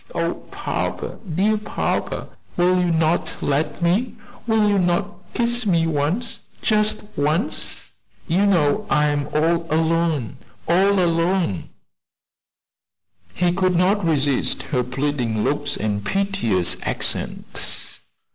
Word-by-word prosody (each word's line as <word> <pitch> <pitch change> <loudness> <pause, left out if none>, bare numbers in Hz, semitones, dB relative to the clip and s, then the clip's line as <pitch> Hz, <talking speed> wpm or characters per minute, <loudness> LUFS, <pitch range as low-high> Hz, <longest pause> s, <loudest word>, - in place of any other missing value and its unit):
Oh, - - 0 0.2
papa, - - -3 0.2
dear 210 +4 +2
papa, 210 - -2 0.3
will 180 +1 +3
you 180 -1 +1
not 165 0 +1
let 150 +4 -1
me 205 +8 +1 0.3
will 220 -2 +3
you 205 -1 +3
not 180 +3 +1 0.2
kiss 240 -1 +1
me 170 -4 +3
once, 165 +10 -1 0.2
just 215 0 +2
once? 155 - -2 0.4
You 190 +4 +3
know 180 +1 +2
I 150 0 +3
am 145 -1 -1
all 165 +1 0
alone! 160 -5 +1 0.3
all 190 +4 +4
alone!" 170 - +1 1.7
He 180 -1 +2
could 185 -1 +1
not 190 +4 +2
resist 145 -5 +1
her 125 -4 -1
pleading 125 -4 -1
looks 145 0 -1
and 105 -1 -2
piteous 195 - +1
accents. - - -2
170 Hz, 115 wpm, -22 LUFS, 145-195 Hz, 1.7 s, all